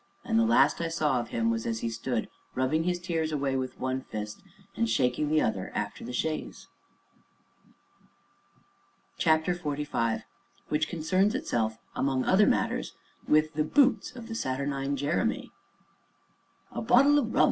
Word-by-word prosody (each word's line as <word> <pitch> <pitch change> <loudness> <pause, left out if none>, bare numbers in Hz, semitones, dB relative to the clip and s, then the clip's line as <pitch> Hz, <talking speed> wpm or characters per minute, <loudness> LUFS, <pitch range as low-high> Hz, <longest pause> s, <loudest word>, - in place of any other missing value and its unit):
and 225 -1 +2
the 230 - +4
last 230 -6 +4
I 165 - 0
saw 155 -6 +1
of 120 - -4
him 115 0 +1
was 115 0 -2
as 115 -1 -2
he 115 - -1
stood 115 0 -2 0.3
rubbing 140 +6 +1
his 180 0 +1
tears 165 -3 -1
away 140 -3 0
with 130 -1 -3
one 130 0 -1
fist 105 -3 -6 0.3
and 230 0 0
shaking 130 - +1
the 155 0 +3
other 95 -4 -2
after 105 -1 -3
the 120 - -6
chaise. 155 +5 -3 2.5
CHAPTER 160 +2 +3
XLV 145 -8 -2 0.5
WHICH 150 +1 0
CONCERNS 185 +6 +1
ITSELF, 110 - -1 0.2
AMONG 135 -2 0
OTHER 200 +3 +5
MATTERS, - - 0 0.3
WITH 155 +1 +3
THE 155 0 +1
BOOTS 255 - +2
OF 235 -2 -8
THE 225 - -6
SATURNINE 140 - -2
JEREMY 145 +5 -1 1.2
"A - - -4
bottle 265 +6 +5
o' - - +1
rum!" 230 - -2
150 Hz, 150 wpm, -28 LUFS, 130-175 Hz, 2.5 s, OTHER